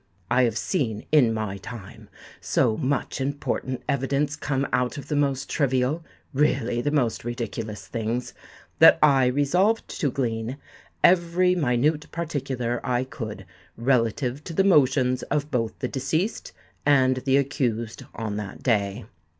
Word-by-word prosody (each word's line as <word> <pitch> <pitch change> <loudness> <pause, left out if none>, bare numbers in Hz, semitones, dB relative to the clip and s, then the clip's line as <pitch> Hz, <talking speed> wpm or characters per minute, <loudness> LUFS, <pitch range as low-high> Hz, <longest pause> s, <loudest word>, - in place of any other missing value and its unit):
I 130 - +4
have 115 - -1
seen, 120 - -2
in 140 -7 +5
my 110 -3 -3
time, 105 -2 -10 0.3
so 110 - +1
much 135 0 -2
important 135 -2 -3
evidence 140 +1 0
come 140 -2 -1
out 125 +3 0
of 140 0 -8
the 150 - 0
most 140 -2 0
trivial—really 135 -2 0
the 145 - 0
most 135 -6 0
ridiculous 115 -3 -5
things, 115 +1 -3 0.5
that - - +8
I 135 -4 +5
resolved 175 - +2
to 150 - +1
glean 120 -1 -2 0.5
every 180 +1 +4
minute 150 -1 +1
particular 130 -7 -3
I 125 -1 0
could 115 -5 -7 0.3
relative 125 +2 0
to 170 - -6
the 190 - +3
motions 130 -8 +3
of 150 +1 -1
both 115 -3 -1
the 125 - -2
deceased 160 - -2 0.3
and 130 -3 +4
the 135 +1 +2
accused 120 -5 -1
on 110 -2 -3
that 100 -2 -7
day. 105 -2 0
130 Hz, 135 wpm, -25 LUFS, 120-145 Hz, 0.5 s, that